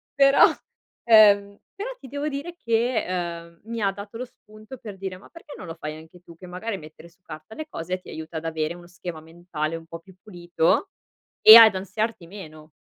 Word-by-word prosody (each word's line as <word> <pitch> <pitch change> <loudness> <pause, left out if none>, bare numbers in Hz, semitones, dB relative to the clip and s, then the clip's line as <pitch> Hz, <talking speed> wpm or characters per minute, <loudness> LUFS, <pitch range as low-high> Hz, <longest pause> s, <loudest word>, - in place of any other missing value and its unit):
Però, 275 0 +6 0.6
ehm, 205 -3 +6 0.2
però 410 +6 -5
ti 270 - -12
devo 285 +3 -4
dire 295 +5 -6
che, 235 -4 0
uhm, 170 -2 -5
mi 230 -1 -4
ha 200 -1 +1
dato 205 +3 -10
lo 250 - -5
spunto 215 0 -15
per 210 -4 -10
dire: 190 -1 -6
"Ma 190 - -18
perché 330 -4 -13
non - - -9
lo 165 - -7
fai 155 -2 -7
anche 160 +3 -15
tu? 170 -2 -16
Che 185 - -13
magari 185 +4 -5
mettere 155 +1 -14
su 180 +2 -32
carta 155 +8 -11
le 310 - -7
cose 185 - -5
ti - - -15
aiuta 160 +1 -7
ad 160 - -7
avere 160 0 -3
uno 175 0 -14
schema 175 -2 -8
mentale 165 -1 -5
un 165 0 -10
pò 165 0 -9
più 185 +2 -19
pulito, 175 - -1 0.5
e 220 - +12
ad 225 -3 +9
ansiarti 195 0 -4
meno". 155 -5 -12
185 Hz, 205 wpm, -24 LUFS, 165-225 Hz, 0.6 s, e